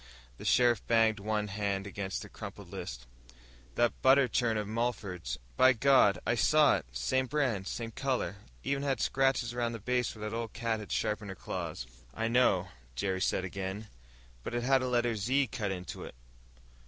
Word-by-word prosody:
The - - -8
sheriff 120 -3 +4
banged 115 -2 +3
one 105 +1 -1
big 100 -1 -7
hand 100 -1 -1
against 95 -1 -4
the - - -9
crumpled - - -9
list. - - -6 0.7
"That 120 -1 +1
butter 135 0 +6
churn 115 -2 +1
of 105 -1 -2
Mulford's. 110 - -2 0.2
By 130 0 +7
God, 130 -5 +5
I - - +2
saw 150 +5 +5
it! - - -9
Same 130 - 0
brand, 125 -10 0
same 115 -1 -4
color. 125 -7 -2 0.3
Even 140 0 -1
had 140 -2 0
scratches 135 -3 +1
around 120 -1 -1
the 115 - -5
base 125 +2 -1
where 105 0 -5
that 105 - -4
old 115 -1 -4
cat 115 -1 -1
of 105 - -9
his - - +1
sharpened 105 -1 -2
her 95 - -6
claws." - - -5 0.3
"I 115 - -1
know," 115 -7 +3 0.3
Jerry 95 +8 -1
said 95 - +1
again. 95 +3 -5 0.5
"But 120 - -5
it 120 - -1
had 135 +1 +4
a 130 - -1
letter 120 -2 +1
'Z' 130 +7 +2
cut 105 -4 -2
into 90 -2 -5
it. - - -10
115 Hz, 190 wpm, -31 LUFS, 100-125 Hz, 0.7 s, By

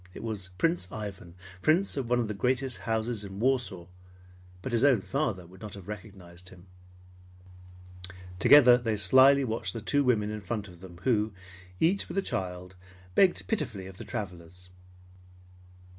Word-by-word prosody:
It - - -8
was 105 -5 -5
Prince 165 - 0
Ivan, 100 -5 -7 0.3
Prince 170 - +2
of 130 -4 -3
one 125 - +3
of 120 -2 0
the 105 - -3
greatest 130 +4 0
houses 110 -1 -1
in 100 0 -8
Warsaw, 120 -8 0 0.8
but 130 - -4
his 120 +1 +1
own 135 -6 +5
father 115 - -2
would 90 +2 -16
not 105 -2 -7
have 95 -3 -11
recognized 95 -4 -9
him. 90 -1 -15 1.7
Together 125 0 +7
they 115 -3 -1
slyly 130 +6 +6
watched 115 -2 -3
the 115 - -4
two 145 +6 +1
women 110 -5 +1
in 105 0 -5
front 105 +1 -4
of 90 -2 -14
them 90 -2 -11
who, 110 -4 +1 0.5
each 185 +5 +2
with - - -6
a 195 - +2
child, 90 - -5 0.4
begged 185 - +3
pitifully 110 - -2
of 95 0 -11
the - - -6
travelers. 90 -2 -8
110 Hz, 160 wpm, -28 LUFS, 95-130 Hz, 1.7 s, Together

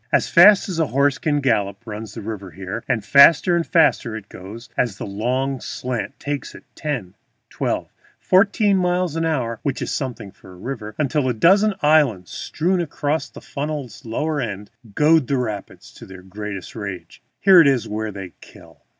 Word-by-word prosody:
As - - +2
fast 200 +3 +6
as 180 -4 -3
a 160 - +2
horse 140 +2 +1
can 145 -2 0
gallop 100 -7 0
runs 105 -1 -7
the 115 - -7
river 100 -3 -6
here, 95 +6 -6
and 110 -4 0
faster 160 +7 +6
and 170 - +1
faster 140 -9 +2
it 105 -2 -9
goes 105 +6 -10
as 115 -6 -1
the - - -5
long 125 +7 -2
slant 125 +2 -5
takes 145 -1 -5
it, - - -13
ten, 125 -12 -4 0.4
twelve, - - -3 0.3
fourteen 200 +1 +3
miles 180 -2 0
an 165 0 0
hour 120 -8 -1
(which 140 -2 -2
is - - -3
something 120 -7 -4
for 95 - -16
a - - -14
river), 110 0 -6
until 145 -2 0
a 125 - -1
dozen 195 - +4
islands 145 - +3
strewn 180 +3 -1
across 150 -1 -2
the - - -12
funnel's 140 -5 -5
lower 145 +6 -2
end 105 -3 -6 0.2
goad 155 -2 +4
the 140 - 0
rapids 110 -5 -5
to - - -13
their 95 -1 -12
greatest 100 0 -7
rage. 100 -5 -7 0.2
Here 190 -3 +7
is 135 -6 +2
where 110 +1 -3
they 95 -3 -8
kill. - - -16
130 Hz, 180 wpm, -21 LUFS, 105-155 Hz, 0.4 s, Here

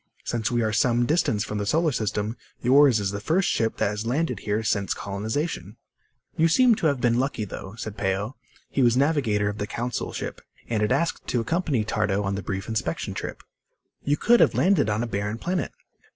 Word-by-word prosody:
Since 115 -2 -1
we 120 -1 +1
are 110 -1 0
some 120 +2 +3
distance 120 -8 +1
from 105 0 -4
the 105 - -2
solar 160 +5 +2
system, 110 -2 -2 0.2
yours 130 -1 +5
is 100 -2 -1
the 100 - -4
first 165 - +1
ship 115 -1 0
that - - +1
has 105 +1 -4
landed 140 +8 -1
here 105 +2 -1
since 100 -2 0
colonization." 105 - -3 0.6
"You 165 - +4
seem 245 +8 +5
to 170 - +1
have 140 -3 +1
been 120 0 +2
lucky, 130 -5 -1
though," 95 +1 -8
said 110 -3 -6
Peo. 100 +5 -1 0.4
He 140 - +1
was 120 -1 +4
navigator 130 -8 +2
of 105 0 -3
the 105 - -2
Council 120 +2 -3
ship, - - -5 0.3
and 110 -2 -1
had 105 - +1
asked 170 0 0
to 125 - 0
accompany 145 -1 0
Tardo 105 -2 0
on 100 0 -1
the 100 - -3
brief 95 +1 -4
inspection 100 -7 -2
trip. - - -6 0.6
"You 145 +1 +1
could 240 +7 +4
have - - +4
landed 180 - +3
on 105 +2 0
a - - -2
barren 105 0 -2
planet." 175 +3 -2
115 Hz, 205 wpm, -25 LUFS, 105-140 Hz, 0.6 s, yours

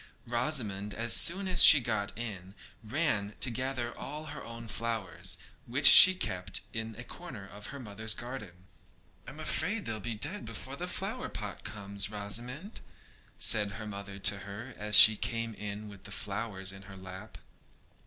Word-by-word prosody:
Rosamond 115 -6 -1
as 115 0 +1
soon 190 +3 +3
as 180 -1 +9
she 155 - +10
got 110 -5 -2
in 100 -5 -7 0.3
ran 110 -5 -2
to 125 - +4
gather 125 -1 -3
all 150 +2 -8
her 145 - -8
own 115 0 -9
flowers, 110 -4 -3 0.3
which 130 +5 -2
she 185 0 +10
kept 95 - -1
in 115 -1 -5
a 125 - -9
corner 125 - -10
of 105 +1 -10
her 140 - -9
mother's 110 -2 -4
garden. 105 -8 -9 0.6
'I - - -6
am - - -12
afraid - - -1
they'll 110 -1 -3
be 110 +3 -5
dead 105 - -2
before - - -7
the - - -5
flower - - -3
pot - - -7
comes, 100 0 -2
Rosamond,' 120 - -7 0.6
said 105 -2 +2
her 105 +2 -8
mother 100 -1 -8
to 100 +1 +4
her, 105 +6 -9
as 105 0 -1
she 110 - +10
came 115 +1 -4
in 105 0 -7
with 100 -2 -14
the - - -9
flowers 100 -2 -5
in 95 0 -12
her 95 - -10
lap. 95 +3 -11
110 Hz, 170 wpm, -30 LUFS, 100-120 Hz, 0.6 s, she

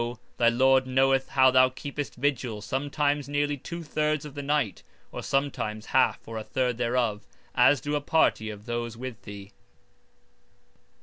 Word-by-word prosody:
thy 120 -1 +5
Lord 130 +2 +3
knoweth 135 +1 +2
how 130 -1 +5
thou 130 0 +5
keepest 140 +2 -6
vigil 125 -5 -2
sometimes 145 +2 -1
nearly 145 0 0
two 170 +5 -7
thirds 150 -1 -1
of 150 - -9
the 145 - -5
night, 140 -8 -1 0.3
or - - -6
(sometimes) 125 -6 -2
half - - +1
or 115 0 -5
a - - -6
third 125 0 -1
thereof, 120 -3 0 0.3
as 125 +3 +5
do 145 +3 -2
a 145 - 0
party 145 -7 +2
of 105 -1 -9
those 120 -1 -4
with 125 -2 -7
thee. 100 -1 -10
130 Hz, 160 wpm, -27 LUFS, 115-145 Hz, 0.3 s, thy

